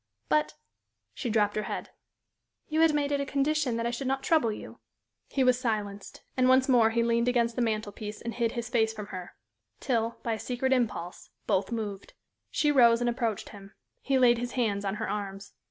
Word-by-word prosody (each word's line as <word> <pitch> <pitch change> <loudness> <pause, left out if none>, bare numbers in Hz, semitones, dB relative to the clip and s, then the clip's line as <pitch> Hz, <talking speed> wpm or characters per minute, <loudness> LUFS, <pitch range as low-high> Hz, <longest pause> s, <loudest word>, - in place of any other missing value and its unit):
"But" 150 0 +1 0.6
she 240 - -4
dropped 210 -2 +2
her 215 - 0
head - - -5 0.8
"you 310 0 0
had 325 -1 +6
made 290 -1 0
it 285 -1 +1
a - - -2
condition 280 -3 +1
that 230 - -2
I 235 - 0
should 250 +2 -4
not 270 0 -1
trouble 310 -9 +3
you." 210 - -9 0.5
He 270 - +1
was 255 -1 +4
silenced; 210 -5 -3
and 255 0 +3
once 260 0 +5
more 240 -4 +5
he 230 +1 +1
leaned 235 +1 +1
against 235 -2 +2
the 250 - -1
mantel 215 -2 -1
piece 210 +1 -7
and 235 - -5
hid 235 -1 0
his 235 -1 -3
face 225 -2 +1
from 210 -1 -6
her, 180 -1 -7 0.4
till, 230 -2 -1
by 230 - 0
a 220 - -4
secret 260 +3 0
impulse, 215 -8 -2 0.2
both 190 +3 0
moved. 210 -4 -5 0.4
She 295 - +2
rose 235 -4 +6
and 240 0 +1
approached 230 -4 -2
him; 200 -1 -13 0.3
he 270 -1 +1
laid 240 -2 +5
his 245 0 -4
hands 205 -5 0
on 195 +1 -1
her 215 - -3
arms. 200 -1 -5
235 Hz, 205 wpm, -28 LUFS, 210-255 Hz, 0.8 s, had